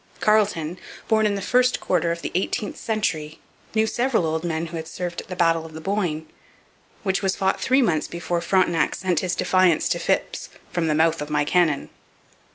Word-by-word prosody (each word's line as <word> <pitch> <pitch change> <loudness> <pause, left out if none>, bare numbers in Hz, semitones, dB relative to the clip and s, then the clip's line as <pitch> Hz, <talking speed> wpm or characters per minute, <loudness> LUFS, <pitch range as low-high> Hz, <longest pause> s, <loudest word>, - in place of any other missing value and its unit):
Carleton, 195 -6 +1 0.3
born 220 -1 +3
in 205 - 0
the 200 - -4
first 250 +3 +3
quarter 170 -2 +1
of 170 0 -4
the - - -3
eighteenth 195 +3 -1
century, 160 -8 -2 0.4
knew 220 0 +4
several 235 -3 +1
old 160 +1 -1
men 165 -1 -2
who 170 0 -6
had 160 0 -6
served 175 +1 -4
at - - -17
the 185 - -6
Battle 165 -2 +2
of 160 -1 -11
the 160 - -7
Boyne, 170 -4 -2 0.8
which 190 -2 0
was 190 -1 0
fought 190 0 0
three 265 +1 +3
months 160 -8 +1
before 170 0 -3
Frontenac 170 -2 +2
sent 185 -3 0
his 180 -1 -1
defiance 185 -4 +3
to - - 0
Phips - - -1 0.2
'from 170 -2 0
the 155 - +1
mouth 160 0 +2
of 150 - -5
my 145 -1 +1
cannon.' 160 -3 +2
175 Hz, 195 wpm, -23 LUFS, 160-195 Hz, 0.8 s, knew